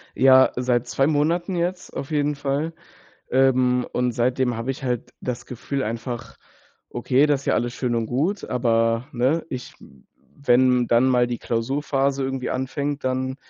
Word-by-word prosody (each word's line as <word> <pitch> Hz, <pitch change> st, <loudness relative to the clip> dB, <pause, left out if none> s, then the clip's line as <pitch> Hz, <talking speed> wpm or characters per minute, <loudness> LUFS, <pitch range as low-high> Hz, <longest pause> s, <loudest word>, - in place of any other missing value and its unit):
Ja, 130 Hz, 0 st, +6 dB
seit 125 Hz, -1 st, 0 dB
2 135 Hz, +3 st, +1 dB
Monaten 165 Hz, +5 st, +1 dB
jetzt 180 Hz, +1 st, -3 dB
auf 140 Hz, -, -5 dB
jeden 150 Hz, -1 st, +1 dB
Fall, 145 Hz, +3 st, -2 dB, 0.6 s
ähm, 125 Hz, -1 st, +3 dB
und 125 Hz, -1 st, 0 dB
seitdem 125 Hz, 0 st, 0 dB
habe 115 Hz, +3 st, -3 dB
ich 135 Hz, -, -6 dB
halt 125 Hz, -2 st, -3 dB
das 125 Hz, -1 st, -5 dB
Gefühl 135 Hz, +2 st, -4 dB
einfach: 115 Hz, +1 st, -5 dB, 0.5 s
Okay, 130 Hz, +4 st, +2 dB
das 145 Hz, -2 st, +1 dB
ist -, -, -15 dB
ja -, -, +2 dB
alles 120 Hz, +1 st, -1 dB
schön 125 Hz, -2 st, -1 dB
und 115 Hz, -1 st, 0 dB
gut, 155 Hz, -, -1 dB
aber 115 Hz, 0 st, +1 dB
ne, 130 Hz, +7 st, +1 dB
ich 125 Hz, -1 st, -7 dB, 0.7 s
wenn 125 Hz, -1 st, +4 dB
dann 120 Hz, +3 st, +3 dB
mal 125 Hz, -2 st, +3 dB
die 120 Hz, -1 st, -4 dB
Klausurphase 135 Hz, +3 st, -1 dB
irgendwie 135 Hz, -1 st, -3 dB
anfängt, 140 Hz, +2 st, -3 dB
dann, 130 Hz, 0 st, -1 dB
130 Hz, 160 wpm, -23 LUFS, 120-140 Hz, 0.7 s, Ja